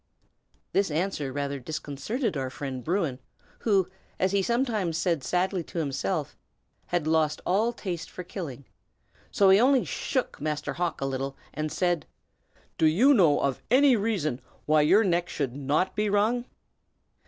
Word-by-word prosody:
This 195 Hz, -2 st, +2 dB
answer 155 Hz, -3 st, -2 dB
rather 140 Hz, 0 st, -3 dB
disconcerted 155 Hz, -, -3 dB
our 135 Hz, -2 st, -2 dB
friend 130 Hz, -1 st, -6 dB
Bruin, 165 Hz, -, -1 dB, 0.4 s
who, 195 Hz, -5 st, +2 dB, 0.3 s
as 190 Hz, 0 st, +2 dB
he 200 Hz, 0 st, +2 dB
sometimes 220 Hz, -7 st, 0 dB
said 170 Hz, -5 st, 0 dB
sadly 180 Hz, +5 st, 0 dB
to -, -, -9 dB
himself, 155 Hz, +1 st, -2 dB, 0.5 s
had 175 Hz, -3 st, -1 dB
"lost 155 Hz, -1 st, +2 dB
all 210 Hz, +6 st, +2 dB
taste 180 Hz, -8 st, -5 dB
for 180 Hz, -, -7 dB
killing;" 145 Hz, -, -7 dB, 0.6 s
so 195 Hz, -1 st, +4 dB
he 195 Hz, -, +7 dB
only 260 Hz, +1 st, +4 dB
shook 260 Hz, -, -2 dB
Master 150 Hz, 0 st, -2 dB
Hawk 175 Hz, -3 st, -2 dB
a -, -, 0 dB
little, 135 Hz, 0 st, -3 dB, 0.2 s
and 155 Hz, 0 st, -3 dB
said, 175 Hz, -3 st, 0 dB, 0.7 s
"Do 160 Hz, -, +5 dB
you 230 Hz, -, +5 dB
know 170 Hz, -, +4 dB
of 135 Hz, -2 st, -1 dB
any 265 Hz, +2 st, +6 dB
reason 195 Hz, -, -1 dB, 0.2 s
why 155 Hz, 0 st, +4 dB
your 185 Hz, +9 st, +5 dB
neck 175 Hz, -2 st, +1 dB
should 135 Hz, -4 st, -3 dB
not 145 Hz, +6 st, 0 dB
be 210 Hz, 0 st, +1 dB
wrung?" 220 Hz, +4 st, +2 dB
175 Hz, 155 wpm, -27 LUFS, 145-200 Hz, 0.7 s, he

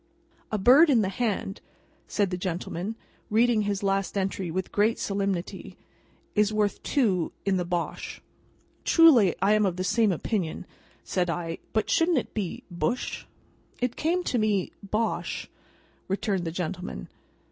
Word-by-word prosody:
"'A 215 Hz, -, +1 dB
bird 265 Hz, -, +7 dB
in 240 Hz, -6 st, +4 dB
the 190 Hz, -, 0 dB
hand,'" 200 Hz, -2 st, -2 dB, 0.5 s
said 200 Hz, -2 st, 0 dB
the -, -, 0 dB
gentleman, 180 Hz, +3 st, -3 dB, 0.3 s
reading 230 Hz, +1 st, +3 dB
his 205 Hz, -1 st, -2 dB
last 195 Hz, 0 st, 0 dB
entry 190 Hz, -2 st, -1 dB
with 185 Hz, +3 st, -3 dB
great 215 Hz, +3 st, +2 dB
solemnity, 195 Hz, -3 st, -3 dB, 0.6 s
"'is 210 Hz, 0 st, +3 dB
worth 210 Hz, -1 st, 0 dB
two 200 Hz, -, +1 dB
in 195 Hz, -1 st, +2 dB
the 180 Hz, -, -1 dB
Bosh.'" 175 Hz, -1 st, -3 dB, 0.6 s
"Truly 265 Hz, -, +6 dB
I 200 Hz, +2 st, +5 dB
am 215 Hz, 0 st, +3 dB
of 190 Hz, -3 st, +1 dB
the 185 Hz, -, -2 dB
same 220 Hz, +2 st, +3 dB
opinion," 180 Hz, -1 st, -2 dB, 0.4 s
said 180 Hz, -2 st, -1 dB
I; 165 Hz, -1 st, -3 dB
"but 220 Hz, -, 0 dB
shouldn't 330 Hz, -1 st, +3 dB
it 250 Hz, -, -2 dB
be 200 Hz, -6 st, -3 dB
Bush?" 240 Hz, +8 st, -2 dB, 0.5 s
"It 245 Hz, -1 st, -1 dB
came 350 Hz, +3 st, 0 dB
to 250 Hz, -, 0 dB
me, 210 Hz, -4 st, +1 dB
Bosh," 215 Hz, +3 st, -2 dB, 0.6 s
returned 195 Hz, -2 st, -1 dB
the 165 Hz, -, -2 dB
gentleman. 175 Hz, -, -4 dB
200 Hz, 145 wpm, -27 LUFS, 185-225 Hz, 0.6 s, bird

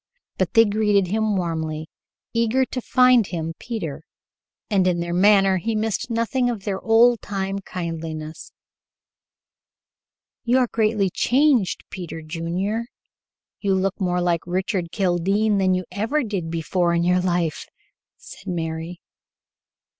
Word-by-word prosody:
But -, -, 0 dB
they 225 Hz, 0 st, +7 dB
greeted 205 Hz, -3 st, +1 dB
him 215 Hz, -1 st, +1 dB
warmly, 160 Hz, -3 st, -3 dB, 0.5 s
eager 235 Hz, +3 st, +2 dB
to 255 Hz, +1 st, -5 dB
find 250 Hz, -3 st, +4 dB
him 165 Hz, -2 st, -4 dB
Peter, 165 Hz, -, -5 dB, 0.7 s
and 195 Hz, -4 st, +2 dB
in 175 Hz, -1 st, +1 dB
their 170 Hz, 0 st, -3 dB
manner 195 Hz, 0 st, +5 dB
he 220 Hz, +5 st, -2 dB
missed 220 Hz, +3 st, -1 dB
nothing 235 Hz, +2 st, 0 dB
of 225 Hz, -5 st, -4 dB
their 195 Hz, -2 st, -3 dB
old 230 Hz, +1 st, +4 dB
time 195 Hz, -1 st, -3 dB
kindliness. 165 Hz, -4 st, -6 dB, 1.9 s
"You 245 Hz, +2 st, +3 dB
are 255 Hz, -, +4 dB
greatly 215 Hz, -4 st, 0 dB
changed, 260 Hz, -, +2 dB
Peter 175 Hz, -3 st, -7 dB
Junior. 175 Hz, +8 st, -3 dB, 0.7 s
You 195 Hz, -2 st, +1 dB
look 190 Hz, +1 st, -1 dB
more 180 Hz, -1 st, +1 dB
like 175 Hz, -2 st, +1 dB
Richard 180 Hz, -1 st, -2 dB
Kildene 195 Hz, +3 st, +1 dB
than 185 Hz, -1 st, +3 dB
you 185 Hz, 0 st, -3 dB
ever 225 Hz, +10 st, 0 dB
did 195 Hz, -7 st, -3 dB
before 170 Hz, +1 st, 0 dB
in 170 Hz, -, +1 dB
your 180 Hz, +1 st, +3 dB
life," 175 Hz, -3 st, -1 dB, 0.5 s
said -, -, -13 dB
Mary. 165 Hz, 0 st, -4 dB
190 Hz, 130 wpm, -22 LUFS, 170-220 Hz, 1.9 s, they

